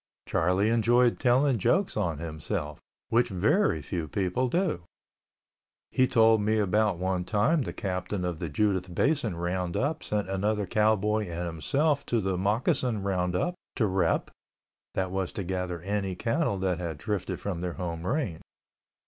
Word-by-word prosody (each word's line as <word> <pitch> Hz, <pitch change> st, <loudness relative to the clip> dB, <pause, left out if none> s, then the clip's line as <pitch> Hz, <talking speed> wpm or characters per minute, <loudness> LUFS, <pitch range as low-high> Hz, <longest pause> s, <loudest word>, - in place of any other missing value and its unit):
Charlie 90 Hz, +5 st, +2 dB
enjoyed 120 Hz, +1 st, +3 dB
telling 130 Hz, 0 st, +3 dB
jokes 185 Hz, -, +2 dB
on 85 Hz, -7 st, -1 dB
himself, 80 Hz, 0 st, -4 dB, 0.3 s
which 120 Hz, +1 st, +3 dB
very 100 Hz, -, +2 dB
few 85 Hz, 0 st, -3 dB
people 95 Hz, -, 0 dB
do. 170 Hz, -, 0 dB, 1.1 s
He 130 Hz, -, +3 dB
told 115 Hz, -3 st, +5 dB
me 110 Hz, +1 st, +1 dB
about 105 Hz, -1 st, +2 dB
one 90 Hz, 0 st, -1 dB
time 110 Hz, -, +2 dB
the -, -, -3 dB
Captain 90 Hz, 0 st, -3 dB
of 85 Hz, -3 st, -3 dB
the 85 Hz, -, -3 dB
Judith 95 Hz, +1 st, 0 dB
Basin 140 Hz, -, +1 dB
Roundup 90 Hz, -, -1 dB
sent 105 Hz, -2 st, -2 dB
another 100 Hz, +2 st, 0 dB
cowboy 105 Hz, +1 st, +2 dB
and 85 Hz, +1 st, -3 dB
himself 140 Hz, -, 0 dB
to 120 Hz, -, +1 dB
the 95 Hz, -2 st, -1 dB
Moccasin 105 Hz, +3 st, +1 dB
Roundup 90 Hz, -, 0 dB, 0.2 s
to 115 Hz, -, +2 dB
rep 95 Hz, -4 st, +1 dB, 0.6 s
(that 95 Hz, -1 st, -1 dB
was 95 Hz, -1 st, -2 dB
to 100 Hz, -, -3 dB
gather 90 Hz, -1 st, -3 dB
any 100 Hz, -1 st, -2 dB
cattle 115 Hz, -, 0 dB
that 95 Hz, -2 st, -1 dB
had 85 Hz, -4 st, -4 dB
drifted 95 Hz, -1 st, -3 dB
from 90 Hz, -4 st, -4 dB
their 90 Hz, -1 st, -2 dB
home 85 Hz, -2 st, -4 dB
range). 120 Hz, -, -1 dB
100 Hz, 150 wpm, -28 LUFS, 90-115 Hz, 1.1 s, told